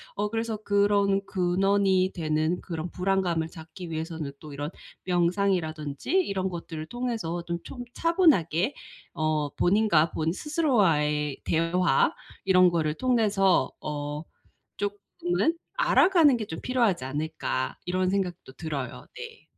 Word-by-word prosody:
어 205 +1 -1
그래서 225 0 -2
그런 200 -1 +2
'근원이 190 +1 +2
되는 155 +1 0
그런 165 -1 -5
불안감을 180 -3 0
잡기 165 +1 -10
위해서는 160 -2 -4
또 150 -2 -10
이런 145 +1 -4 0.4
명상이라든지 175 -5 0
이런 200 - +1
것들을 165 -3 -6
통해서 215 -6 -3
좀 170 0 -3
좀 245 -2 -7
차분하게 275 - +3 0.4
어 155 -2 0
본인과 175 -5 +3
본인 160 0 -1
스스로와의 170 - +1
대화 165 -2 +2 0.3
이런 185 -1 +6
거를 160 -3 0
통해서 210 -7 +2
어 150 0 -4 0.5
쪼끔은 205 - -1 0.2
알아가는 335 -8 +5
게 220 -3 -4
좀 160 -4 -6
필요하지 235 - +1
않을까.' 145 -2 -3
이런 185 +1 +1
생각도 185 -7 -2
들어요. 135 - -5
네. - - -9
180 Hz, 280 characters per minute, -27 LUFS, 160-205 Hz, 0.5 s, 이런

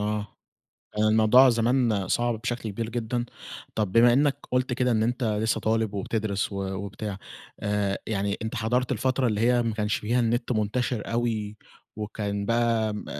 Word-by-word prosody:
آآ، 105 0 -1 0.8
الموضوع 110 +4 +6
زمان 115 -4 +1
صعب 120 0 0
بشكل 120 -2 -3
كبير 110 +3 -4
جدًا. 120 +1 -2 0.5
طب، 105 -4 0
بما 120 +2 +6
إنّك 140 +1 +3
قلت 125 0 +1
كده 125 0 +1
إن 110 -1 +2
أنت 125 +2 -1
لسّه 110 +1 0
طالب 110 -1 0
وبتدرس 100 0 -2
و 100 0 -3
وبتاع 100 +1 -5 0.4
آآ، 105 -1 0
يعني 100 -1 -1
أنت 110 +2 -4
حضرت 120 +3 0
الفترة 130 +2 +1
اللي 105 -1 0
هي 120 +1 +4
ما 115 -2 -1
كانش 105 -1 0
فيها 120 +4 0
النت 120 +1 0
منتشر 110 +1 -1
أوي، 110 -3 -1 0.4
وكان 105 -1 -3
بقى 115 -2 +1
م 105 - -6
110 Hz, 160 wpm, -26 LUFS, 105-120 Hz, 0.8 s, الموضوع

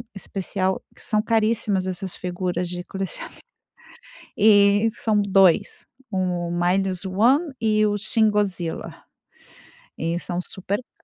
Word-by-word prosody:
especial 190 -1 -2
que - - -15
são 215 -2 +1
caríssimas, 215 -3 +1
essas 185 0 -4
figuras 180 0 -3
de 180 0 -4
colecionáveis 195 -1 -6 1.0
e 205 +1 +5
são 215 -3 +1
2: 195 -1 +3 0.2
"O 180 -3 -1
Minus 185 +2 0
one" 255 - +2
e 215 -1 +2
o 205 - 0
"Shingozila" 205 -6 0 1.0
e 165 +2 -2
são 175 0 -4
super 190 +2 -3 0.2
ca - - -34
195 Hz, 115 wpm, -23 LUFS, 180-215 Hz, 1.0 s, e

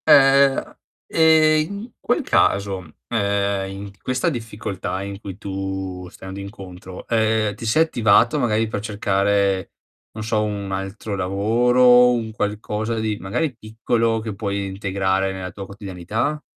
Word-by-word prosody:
Ehm, 135 -1 +6
a - - -6 0.3
ehm, 155 -1 +4
in 235 +3 -10
quel 245 +6 0
caso, 95 - +1
ehm, 100 -3 0
in 100 +1 -7
questa 130 +5 0
difficoltà 105 - -4
in 100 0 -6
cui 95 -2 -7
tu 95 -2 -5
stai 95 - -11
andando 95 +1 -7
incontro, 95 -2 -9
ehm, 110 -2 +1
ti 105 - -8
sei 155 +9 +4
attivato 120 -1 +3
magari 115 -3 +1
per 110 - -3
cercare, 100 -2 0 0.4
non 110 - -6
so, 110 -1 0
un 100 -2 -3
altro 95 +2 -4
lavoro, 120 +6 +4
un 115 -2 -2
qualcosa 105 +1 -2
di 110 -1 -1
magari 125 - -2
piccolo 115 +1 -1
che 110 -1 -5
puoi 100 -1 -3
integrare 95 0 -1
nella 95 -1 -6
tua 100 +3 -8
quotidianità? 100 - -3
105 Hz, 140 wpm, -22 LUFS, 95-115 Hz, 0.4 s, Ehm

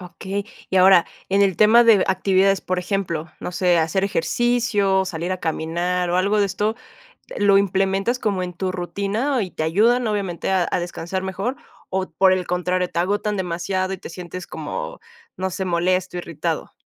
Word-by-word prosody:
Okey. 190 +2 -5 0.3
Y 190 - 0
ahora 185 -1 +6 0.2
en 195 +1 +3
el 190 -4 +2
tema 220 +3 +6
d 225 -3 +6
de - - +2
actividades, 190 +1 +2
por 185 0 -2
ejemplo, 180 -4 -3
no - - -4
sé, 180 -1 +2
hacer 165 +4 +1
ejercicio, 200 0 +1
salir 175 0 -3
a 185 - -4
caminar, 175 +3 -1
o 175 - +1
algo 200 +3 +2
de 200 - +3
esto, 210 +3 -1 0.6
¿lo 200 -1 +5
implementas 195 +4 +1
como 200 -4 -1
en 180 0 -5
tu 185 +1 -2
rutina 205 +9 -1
y 185 -3 -4
te - - -3
ayudan 225 +10 +3
obviamente 195 -6 -2
a 185 -3 +2
a - - 0
descansar 175 +2 -4
mejor, 195 +7 -3 0.3
o 190 0 -2
por 185 +3 +4
el 185 -1 -1
contrario, 180 +1 -1
te 170 - -3
agotan 205 +3 0
demasiado 185 +1 -2
y 190 - -5
te - - -10
sientes 180 +1 -8
como, - - -6 0.4
no 190 0 -2
sé, 190 - -4
molesto, 180 +1 0
irritado? 165 -1 -4
190 Hz, 180 wpm, -22 LUFS, 180-200 Hz, 0.6 s, ahora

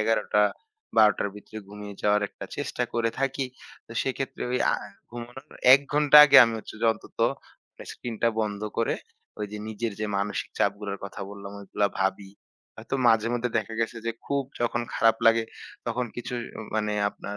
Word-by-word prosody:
১১:০০-১২:০০ 110 - +1
র - - -2
ভেতরে 105 +1 -12
ঘুমিয়ে 105 0 -8
যাওয়ার 105 0 +3
একটা - - -10
চেষ্টা - - -2
করে 115 -1 +1
থাকি। 135 0 0 0.4
তো - - -11
সেক্ষেত্রে 135 0 -3
ঐ - - -2 0.2
আ - - +2 0.4
ঘুমানোর 120 +3 -9 0.3
১ 135 - +8
ঘন্টা 150 0 +6
আগে 140 -1 +6
আমি 115 -1 -2
হচ্ছে 110 - -10
যে 115 - +2
অন্তত - - -16 0.5
মানে - - -12
স্ক্রিনটা 115 -1 -2
বন্ধ 105 -2 -2 0.2
করে 115 - +1 0.4
ওই 105 - -2
যে 105 - -4
নিজের 110 +1 -3
যে 110 - 0
মানসিক 100 +1 -2
চাপগুলার 100 0 -1
কথা 100 - -8
বললাম 100 -1 -9
ঐগুলা 100 +1 0
ভাবি। 95 0 -1 0.5
হয়তো 110 +4 -5
মাঝেমধ্যে 115 +2 +2
দেখা 110 +1 -4
গেছে 115 +1 -1
যে - - +1 0.2
খুব 140 0 0 0.2
যখন 120 0 0
খারাপ 115 0 +4
লাগে 115 0 +5 0.4
তখন 120 +1 -1
কিছু 120 +1 -5 0.4
মানে 105 -1 0 0.2
আপনার 100 0 -8
115 Hz, 165 wpm, -26 LUFS, 105-120 Hz, 0.5 s, ১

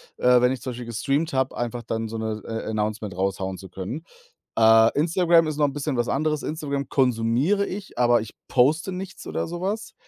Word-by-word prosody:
äh, 125 0 +5
wenn 125 +1 +3
ich 130 - -7
zum 130 - -4
Beispiel 120 0 -7
gestreamt 135 +8 -1
habe, 130 0 0
einfach 120 0 -3
dann 115 0 -3
so 115 +1 -5
'ne 110 -1 -3
äh, 115 -1 -4
announcement 105 -3 -2
raushauen 95 0 -2
zu 95 - -10
können. 95 - -6 0.5
Äh, 110 +1 +6
Instagram 170 +1 +4
ist 150 -1 -3
noch 150 - +3
'n 140 - -5
bisschen 145 -2 -2
was 120 0 +1
anderes. 150 +1 0
Instagram 140 -3 -3
konsumiere 130 - +2
ich, 195 +1 -7
aber 120 -2 +4
ich 110 - -8
poste 155 +9 +2
nichts 185 +1 -7
oder - - -2
so 175 +1 -5
was 205 +4 -3
125 Hz, 205 wpm, -24 LUFS, 115-155 Hz, 0.5 s, Äh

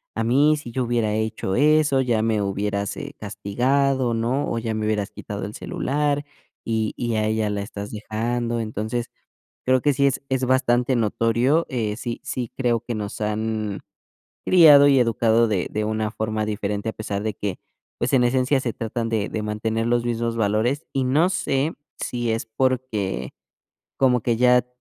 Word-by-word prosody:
a 115 - 0
mí 145 +6 +4
si 120 -5 -8
yo 130 +1 -1
hubiera 115 -3 0
hecho 110 -3 -2
eso, 150 -1 +4
ya 120 -4 +1
me 110 -2 +1
hubieras, 100 0 -2
eh, - - -7
castigado, 130 +3 0
¿no? 125 +6 0
O 115 - -1
ya 115 -1 -2
me 110 0 -2
hubieras 105 -2 -1
quitado 100 -1 -6
el 105 - -7
celular, 145 0 -1 0.4
y 110 -1 -1
y 120 -2 -1
a 110 - +1
ella 110 -1 0
la 100 -1 -2
estás 100 0 -7
dejando". 115 +2 -2
Entonces, 110 +2 -3 0.5
creo 130 -1 +3
que 145 -1 +3
sí 140 +2 +2
es 140 0 +1
es 130 -1 0
bastante 125 0 +2
notorio. 115 +7 +2
Eh, 110 -6 -2
sí, 120 -1 -4
sí 125 -3 -4
creo 120 -3 +1
que 120 0 -5
nos 105 -2 -5
han 105 -1 -2 0.6
criado 150 -5 +8
y 135 -2 +5
educado 115 -1 +3
de 100 -5 -1
de 105 0 -2
una 110 0 -1
forma 110 -1 -2
diferente, 105 0 -3
a 110 - -1
pesar 100 -2 -4
de 110 -2 -2
que, 100 -2 -4 0.4
pues, - - -1
en 125 - +5
esencia 130 +2 +2
se 120 -3 -2
tratan 115 +1 -3
de 110 -2 0
de 110 - -3
mantener 110 +2 -2
los 120 0 +1
mismos 115 0 -1
valores. 110 +7 0
Y, 135 -1 +1
no 150 +7 +3
sé, 145 -4 0 0.3
si 120 -2 -2
es 110 0 -2
porque 110 - -1 0.6
como 125 -3 +3
que 115 0 +1
ya, 125 0 +4
115 Hz, 180 wpm, -23 LUFS, 110-130 Hz, 0.6 s, criado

